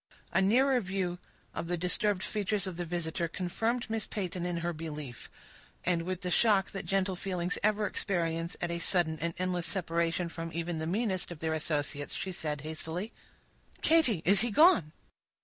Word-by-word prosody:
A - - +3
nearer 250 +6 +4
view 185 -2 -2 0.3
of - - -4
the 175 0 -1
disturbed 185 +3 +1
features 210 -1 -1
of 185 -2 -4
the 175 +1 -3
visitor 170 0 -2
confirmed 225 +8 -1
Miss 225 -2 -2
Peyton 180 -3 -3
in 175 -1 -2
her 175 - 0
belief; 150 -5 -7 0.6
and, 175 -2 +2
with 185 +2 -3
the 180 -1 -2
shock 200 0 +4
that 195 - -5
gentle 195 -1 +1
feelings 180 -1 -2
ever 215 0 +2
experience 170 -4 -1
at 175 - -1
a 170 - -2
sudden 170 -3 +1
and 170 +1 -2
endless 180 -1 -1
separation 170 -2 0
from 165 0 -5
even 170 0 -2
the 160 - -2
meanest 190 -1 0
of 175 - -6
their 160 +1 -1
associates, 145 -2 -1
she 190 - -3
said 150 -5 -3
hastily,— 160 +7 -4 0.7
"Katy, 285 - +4
is 195 +2 +7
he 240 - +1
gone?" 215 - +6
180 Hz, 175 wpm, -31 LUFS, 165-195 Hz, 0.7 s, is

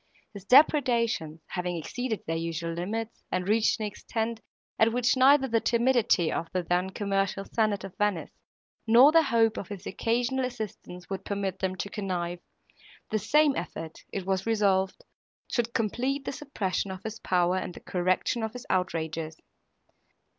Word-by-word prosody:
His 200 -2 -10
depredations 235 - +3
having 180 -1 -2
exceeded 225 +7 -4
their 165 - -2
usual 165 0 -3
limits, 215 +7 -4
and 185 0 -1
reached 215 +2 +3
an 215 - -1
extent, 225 +2 -3 0.4
at 220 +1 +5
which 245 +2 +2
neither 270 +1 +5
the 230 -2 +2
timidity 235 -8 +2
of 165 - -2
the 185 -1 0
then 180 +2 0
commercial 195 0 -1
senate 215 -3 0
of 195 -1 -8
Venice, 205 -5 0 0.6
nor 245 +6 +8
their 330 +1 +6
hope 230 -6 +2
of - - -5
his 200 -2 -8
occasional 245 +3 0
assistance 215 -7 -6
would 195 - -3
permit 195 -2 -3
them 185 -1 -1
to 190 - -4
connive, 180 -4 -3 0.7
the 215 - +1
same 290 +7 +3
effort, 165 -2 -6
it 195 -2 -4
was 190 +1 -1
resolved, 195 -4 +1 0.4
should 235 -1 -1
complete 255 +6 -1
the - - -2
suppression 205 -10 -3
of 190 0 -7
his 220 0 -6
power 180 -1 +2
and 180 - -4
the - - -9
correction 185 +6 0
of 220 0 -3
his 250 - -8
outrages. 160 -3 -2
205 Hz, 160 wpm, -28 LUFS, 180-235 Hz, 0.7 s, nor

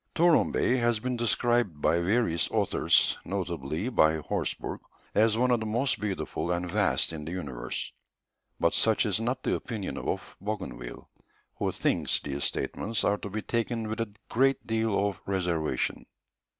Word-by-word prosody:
Touron 170 -1 +4
Bay 130 - +2
has 120 -2 +2
been 125 +2 -2
described 120 -6 +1
by 85 +3 +3
various 85 -3 +1
authors, - - +2
notably 85 - -3
by 80 -11 +4
Horsburgh, 75 - -3 0.3
as 110 +1 +4
one 125 +1 +3
of 120 - +3
the 110 - -3
most 120 +3 +1
beautiful 100 -4 -3
and 90 0 -1
vast 100 -4 +2
in 75 -2 -5
the 80 - -6
universe; 70 -10 -4 0.7
but 85 - +3
such 110 0 +3
is 105 -2 +1
not 125 +3 -1
the - - +1
opinion 110 -6 -4
of - - -4
Bougainville, 95 - -5 0.5
who - - +1
thinks - - +1
these 70 0 -3
statements 115 0 -2
are 100 - +2
to 100 - -6
be 110 +2 -4
taken 115 -1 -1
with 110 +2 -3
a 110 -2 -3 0.2
great 135 +3 +2
deal 110 -3 +1
of 100 - -4
reservation. 90 -5 -1
105 Hz, 160 wpm, -28 LUFS, 85-115 Hz, 0.7 s, Touron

